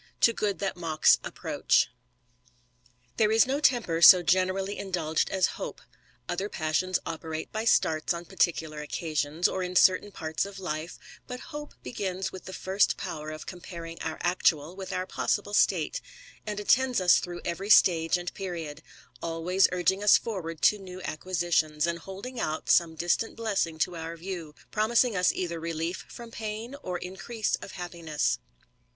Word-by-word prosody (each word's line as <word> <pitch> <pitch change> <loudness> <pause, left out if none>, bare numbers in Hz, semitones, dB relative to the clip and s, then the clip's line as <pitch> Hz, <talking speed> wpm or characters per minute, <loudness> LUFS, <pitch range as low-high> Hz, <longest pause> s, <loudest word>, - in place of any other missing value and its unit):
To 230 - +6
good 205 -4 -1
that 195 +1 -2
mocks 165 -3 +3
approach." - - +1 1.3
TTHERE 215 -1 +4
is 225 - +6
no 270 +3 -1
temper 235 - +2
so 180 +1 +10
generally 185 +2 +1
indulged 170 -5 -1
as 190 -1 +2 0.2
hope; - - -5
^ - - -21 0.4
other 190 +4 -2
passions 175 +2 0
operate 160 -1 -5
by 220 +1 -3
starts 155 -8 +2
on 170 0 -3
particular 160 -4 0
occasions, 155 +1 -1
or 190 - -3
in 180 0 -4
certain 185 +3 +4
parts 160 -4 -2
of 200 0 -7
life; 165 -3 -4 0.3
but 250 -1 -6
hope 295 0 -7
begins 190 -4 -3
with 185 - -10
the 185 - -7
first 190 +2 +1
power 155 0 -5
of 155 0 -7
comparing 170 -2 -8
our 160 - -3
actual 175 -2 +1
with 190 0 -7
our 185 0 -2
possible 205 +2 -1
state, - - +2 0.5
and 210 -1 -3
attends 250 +4 +3
us 180 -1 +5
through 175 -1 -6
every 185 +4 -3
stage 165 -4 +5
and 175 0 -5
period, 170 -6 -5 0.4
always 170 +3 +2
urging 180 +2 +1
us 210 - +7
forward 165 -8 -5
to 210 - +5
new 185 -1 -9
acquisitions, 165 -3 0
and 170 0 -2
holding 200 +8 -8
out 155 -6 -1
some 165 -2 +4
distant 175 +7 0
blessing 200 -8 -1
to 175 +2 0
our 165 0 -6
view, 170 -3 -6 0.2
promising 225 +2 +2
us 180 -1 +3
either 170 -2 -3
relief 165 +2 -3
from 235 -1 -10
pain, 220 +2 -5
or 180 -1 -3
increase 195 +5 -4
of - - -10
happiness. 170 -4 -2
180 Hz, 160 wpm, -28 LUFS, 165-200 Hz, 1.3 s, so